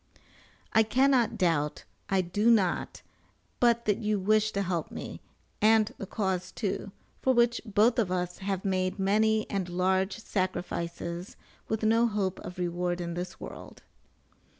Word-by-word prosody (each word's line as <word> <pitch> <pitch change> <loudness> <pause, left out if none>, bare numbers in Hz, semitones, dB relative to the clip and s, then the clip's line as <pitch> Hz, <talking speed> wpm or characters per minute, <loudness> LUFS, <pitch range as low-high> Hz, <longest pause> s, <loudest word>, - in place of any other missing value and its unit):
I 220 - +6
cannot 250 +1 +3
doubt, 150 -5 0 0.3
I 195 -1 +3
do 205 +6 +1
not, 200 -6 +1 0.6
but 235 -1 +3
that 210 -2 +1
you 215 -1 0
wish 215 +2 +3
to 200 - 0
help 175 -3 -2
me, - - -7 0.4
and 220 0 +4
the 195 - -5
cause 190 -3 -2
too, 200 -2 -3 0.3
for 260 -1 +3
which 235 0 +3
both 220 +3 +3
of 200 -6 +1
us 180 -1 -2
have 195 -1 -3
made 185 -1 0
many 215 +2 +2
and 190 -3 -2
large 190 +3 +1
sacrifices 175 -3 -3 0.3
with 220 0 -2
no 225 +2 +4
hope 200 -4 -1
of 180 - -8
reward 175 0 -1
in 170 -1 -3
this 175 +1 -5
world. - - -10
195 Hz, 150 wpm, -29 LUFS, 180-220 Hz, 0.6 s, I